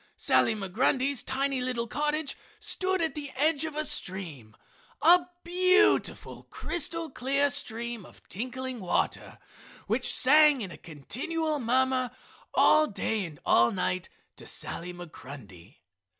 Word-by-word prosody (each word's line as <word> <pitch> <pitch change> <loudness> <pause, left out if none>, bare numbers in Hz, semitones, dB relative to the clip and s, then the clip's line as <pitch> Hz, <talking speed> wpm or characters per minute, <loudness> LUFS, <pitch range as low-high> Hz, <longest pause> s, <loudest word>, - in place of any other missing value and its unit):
Sally 225 - +2
Migrundy's 255 +6 0
tiny 270 0 -1
little 250 -2 -2
cottage 300 +3 -2 0.2
stood 380 -4 0
at 320 -3 -1
the 290 -1 -6
edge 305 +2 +2
of 315 -2 -6
a 305 0 -1
stream, 160 - -3 0.4
a 345 +3 +5 0.2
beautiful 365 +3 +2
crystal 330 -2 -2
clear 275 +3 0
stream 235 -5 -4
of - - -18
tinkling 255 +4 -5
water 185 -3 -2 0.5
which - - 0
sang 295 0 +5
in 190 -4 -5
a - - -8
continual 300 - -3
murmur 255 +1 +1 0.5
all 310 0 +5
day 215 0 -2
and 155 -4 -10
all 120 +1 +4
night 185 -1 -2 0.3
to - - -11
Sally 175 +1 -4
Migrundy. 130 - -12
260 Hz, 125 wpm, -28 LUFS, 195-305 Hz, 0.5 s, a